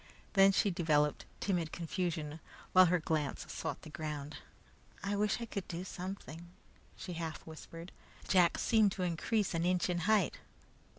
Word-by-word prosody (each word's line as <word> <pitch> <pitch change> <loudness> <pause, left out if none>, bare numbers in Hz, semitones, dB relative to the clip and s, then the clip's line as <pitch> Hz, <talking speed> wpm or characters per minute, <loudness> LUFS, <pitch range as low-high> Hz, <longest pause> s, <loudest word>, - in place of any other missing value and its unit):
Then 195 -1 +7
she 195 +1 +2
developed 150 -4 +2
timid 175 -5 0
confusion, 165 -3 -3 0.3
while 185 0 +8
her 180 +1 +3
glance 155 -3 -1
sought - - -4
the 155 - -10
ground. 150 -2 -5 0.7
"I 200 +1 0
wish 210 +2 +1
I 235 - -3
could 200 -4 -5
do 175 +1 -4
something," 180 -3 -7 0.5
she 185 -1 -6
half 165 -2 -5
whispered. 165 +2 -9 0.4
Jack 180 -2 +4
seemed 215 -4 +3
to 185 - -3
increase 185 +4 0
an 165 0 0
inch 180 0 +2
in 175 - 0
height. 200 0 +2
175 Hz, 155 wpm, -34 LUFS, 160-195 Hz, 0.7 s, while